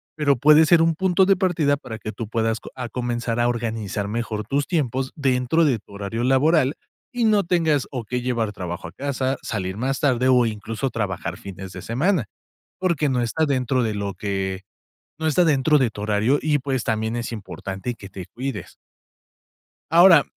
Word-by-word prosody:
pero 145 Hz, -3 st, +2 dB
puede 150 Hz, +5 st, +6 dB
ser 165 Hz, +1 st, +5 dB
un 165 Hz, 0 st, +3 dB
punto 190 Hz, +2 st, +3 dB
de 195 Hz, +1 st, +4 dB
partida 170 Hz, -6 st, +2 dB
para 115 Hz, -6 st, -8 dB
que 110 Hz, -, -6 dB
tú 110 Hz, +2 st, -5 dB
puedas 115 Hz, 0 st, 0 dB
co -, -, -10 dB
a 125 Hz, -2 st, -4 dB
comenzar 120 Hz, -1 st, -2 dB
a 120 Hz, -, +3 dB
organizar 110 Hz, -4 st, -3 dB
mejor 110 Hz, 0 st, -3 dB
tus 140 Hz, +1 st, 0 dB
tiempos 135 Hz, -6 st, -1 dB
dentro 135 Hz, +3 st, +2 dB
de 135 Hz, -6 st, +2 dB
tu 105 Hz, -, -22 dB
horario 100 Hz, +3 st, -4 dB
laboral, 135 Hz, +2 st, +3 dB, 0.4 s
y 240 Hz, -2 st, +1 dB
no 210 Hz, -2 st, +4 dB
tengas 160 Hz, -5 st, +1 dB
o 125 Hz, -3 st, -4 dB
qué 125 Hz, +3 st, -2 dB
llevar 115 Hz, -4 st, -1 dB
trabajo 90 Hz, -3 st, -5 dB
a -, -, -10 dB
casa, 135 Hz, -1 st, -2 dB
salir 95 Hz, -3 st, -3 dB
más 130 Hz, +3 st, -1 dB
tarde, 130 Hz, -2 st, +2 dB
o 125 Hz, -2 st, +5 dB
incluso, 110 Hz, +4 st, -3 dB
trabajar 95 Hz, -7 st, -3 dB
fines 95 Hz, -1 st, -9 dB
de -, -, -7 dB
semana, 140 Hz, -, +1 dB, 0.6 s
porque 170 Hz, -5 st, +1 dB
no 125 Hz, -2 st, +1 dB
está 155 Hz, +7 st, 0 dB
dentro 130 Hz, -2 st, +1 dB
de 110 Hz, -2 st, -1 dB
lo 100 Hz, -1 st, -3 dB
que 95 Hz, -2 st, -3 dB, 0.6 s
no 160 Hz, -, 0 dB
está 175 Hz, +3 st, +3 dB
dentro 150 Hz, 0 st, +4 dB
de 130 Hz, -3 st, +2 dB
tu 105 Hz, -, -8 dB
horario 110 Hz, +6 st, +2 dB
y, 150 Hz, -1 st, +2 dB
pues, 130 Hz, -2 st, -2 dB
también 110 Hz, +1 st, -1 dB
es 120 Hz, 0 st, -3 dB
importante 100 Hz, 0 st, -5 dB
que 100 Hz, -4 st, -11 dB
te 95 Hz, -2 st, -8 dB
cuides. 125 Hz, -, -5 dB, 1.2 s
Ahora, 170 Hz, -3 st, +8 dB
125 Hz, 190 wpm, -23 LUFS, 110-150 Hz, 1.2 s, Ahora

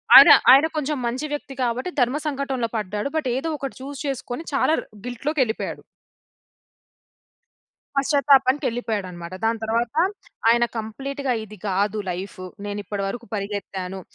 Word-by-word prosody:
ఆయన, -, -, +12 dB, 0.2 s
ఆయన 275 Hz, +4 st, +8 dB
కొంచెం 300 Hz, 0 st, -1 dB
మంచి 260 Hz, +6 st, -2 dB
వ్యక్తి 285 Hz, -2 st, -5 dB
కాబట్టి, 250 Hz, +9 st, -1 dB
ధర్మ 250 Hz, +4 st, +2 dB
సంకటంలో 270 Hz, -5 st, -1 dB
పడ్డాడు. 210 Hz, +5 st, -2 dB
బట్, 275 Hz, -5 st, 0 dB
ఏదో 325 Hz, +4 st, -2 dB
ఒకటి 275 Hz, -1 st, -5 dB
చూస్ 275 Hz, 0 st, -7 dB
చేసుకొని 265 Hz, +2 st, -4 dB
చాలా 310 Hz, -, +3 dB
రు -, -, -14 dB, 0.2 s
గిల్ట్‌లోకెళిపోయాడు. 250 Hz, -1 st, -1 dB, 2.2 s
పశ్చాతాపానికెళ్ళిపోయాడనమాట. 245 Hz, -, +2 dB
దాని 225 Hz, 0 st, +1 dB
తరువాత, 230 Hz, +3 st, 0 dB, 0.5 s
ఆయన 240 Hz, +1 st, +5 dB
కంప్లీట్‌గా 270 Hz, +4 st, -3 dB
ఇది 215 Hz, 0 st, -12 dB
కాదు 205 Hz, +3 st, 0 dB
లైఫు. 185 Hz, +1 st, -6 dB, 0.2 s
నేనిప్పడి 205 Hz, 0 st, -4 dB
వరకు 235 Hz, +3 st, -6 dB
పరిగెత్తాను. 195 Hz, -2 st, -4 dB
240 Hz, 120 wpm, -23 LUFS, 205-275 Hz, 2.2 s, ఆయన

